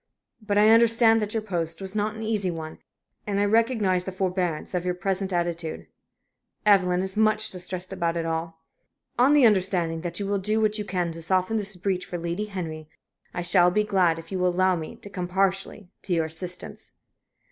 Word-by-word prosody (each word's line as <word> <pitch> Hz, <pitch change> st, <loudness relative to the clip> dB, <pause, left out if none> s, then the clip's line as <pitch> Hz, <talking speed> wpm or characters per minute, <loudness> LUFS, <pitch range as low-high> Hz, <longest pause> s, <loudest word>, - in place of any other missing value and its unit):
But 205 Hz, -1 st, -1 dB
I 210 Hz, +1 st, +6 dB
understand 230 Hz, 0 st, +6 dB
that 210 Hz, +1 st, -2 dB
your 220 Hz, -, -1 dB
post 170 Hz, -5 st, -3 dB
was 195 Hz, +1 st, -3 dB
not 215 Hz, +1 st, -1 dB
an 220 Hz, -, -6 dB
easy 215 Hz, -4 st, -1 dB
one, 160 Hz, -2 st, -6 dB, 0.5 s
and 200 Hz, -1 st, 0 dB
I 205 Hz, -, +3 dB
recognize 215 Hz, -4 st, +2 dB
the 190 Hz, -, -4 dB
forbearance 185 Hz, -3 st, -2 dB
of 180 Hz, -1 st, -1 dB
your 180 Hz, 0 st, -1 dB
present 190 Hz, +1 st, -1 dB
attitude. 170 Hz, -2 st, -2 dB, 0.8 s
Evelyn 185 Hz, -3 st, +4 dB
is 190 Hz, 0 st, -5 dB
much 215 Hz, 0 st, +2 dB
distressed 185 Hz, 0 st, -4 dB
about 170 Hz, -2 st, -1 dB
it 165 Hz, -, -2 dB
all. 165 Hz, 0 st, -4 dB, 0.6 s
On 265 Hz, +4 st, +5 dB
the 290 Hz, -4 st, +6 dB
understanding 185 Hz, -6 st, +2 dB
that 175 Hz, +1 st, -4 dB
you 200 Hz, -, -2 dB
will 200 Hz, 0 st, 0 dB
do 215 Hz, +3 st, 0 dB
what 215 Hz, 0 st, +1 dB
you 210 Hz, -, -3 dB
can 180 Hz, -4 st, -2 dB
to 165 Hz, 0 st, -8 dB
soften 185 Hz, +5 st, +1 dB
this 205 Hz, -2 st, -2 dB
breach 185 Hz, 0 st, -2 dB
for 175 Hz, -, -4 dB
Lady 170 Hz, +4 st, -3 dB
Henry, 160 Hz, -6 st, -6 dB, 0.4 s
I 175 Hz, -, -4 dB
shall 175 Hz, 0 st, +4 dB
be, 210 Hz, +4 st, +1 dB
glad 185 Hz, -6 st, +2 dB
if 165 Hz, +2 st, -11 dB
you 190 Hz, -, -2 dB
will 180 Hz, -, +2 dB
allow 185 Hz, +1 st, +2 dB
me 160 Hz, -2 st, -6 dB
to -, -, -10 dB
come 180 Hz, -3 st, -5 dB
partially 195 Hz, +1 st, -1 dB
to 185 Hz, -, -2 dB
your 165 Hz, -1 st, +1 dB
assistance." 175 Hz, +3 st, -7 dB
185 Hz, 200 wpm, -25 LUFS, 175-210 Hz, 0.8 s, I